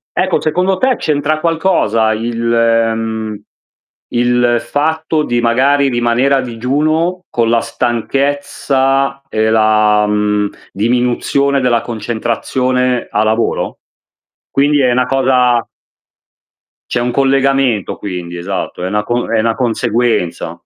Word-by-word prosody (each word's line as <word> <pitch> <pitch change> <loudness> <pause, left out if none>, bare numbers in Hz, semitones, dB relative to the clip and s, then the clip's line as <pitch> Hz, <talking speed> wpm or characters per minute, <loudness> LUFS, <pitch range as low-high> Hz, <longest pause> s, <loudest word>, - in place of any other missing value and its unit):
Ecco, 185 -1 +1
secondo 180 +4 0
te 260 +3 +2
c'entra 155 +1 0
qualcosa 160 - +1
il 115 +1 -3
mhmm, 115 -2 0 0.7
il 120 0 +2
fatto 160 +3 -1
di 120 -2 0
magari 135 +4 +2
rimanere 120 +3 +1
a 135 - +1
digiuno, 155 +9 -1
con 115 -1 +1
la 115 -1 +2
stanchezza 135 +3 -1
e 110 -3 0
la, 110 -1 +3
mhmm, 105 0 0 0.2
diminuzione 125 +5 0
della 120 -3 +2
concentrazione 120 +3 -1
a 105 - +1
lavoro? 110 +2 -1 0.7
Quindi 145 +1 +2
è 125 -2 +3
'na 125 0 +2
cosa 125 -3 +2 1.2
C'è - - -1
un 120 0 -1
collegamento 135 -4 +1
quindi 90 -3 -6
esatto, 90 0 -4
è - - -1
una 105 +2 -1
co 120 +2 -2
è 115 - +2
una 115 0 +1
conseguenza. 115 -6 -1
120 Hz, 115 wpm, -15 LUFS, 110-135 Hz, 1.2 s, la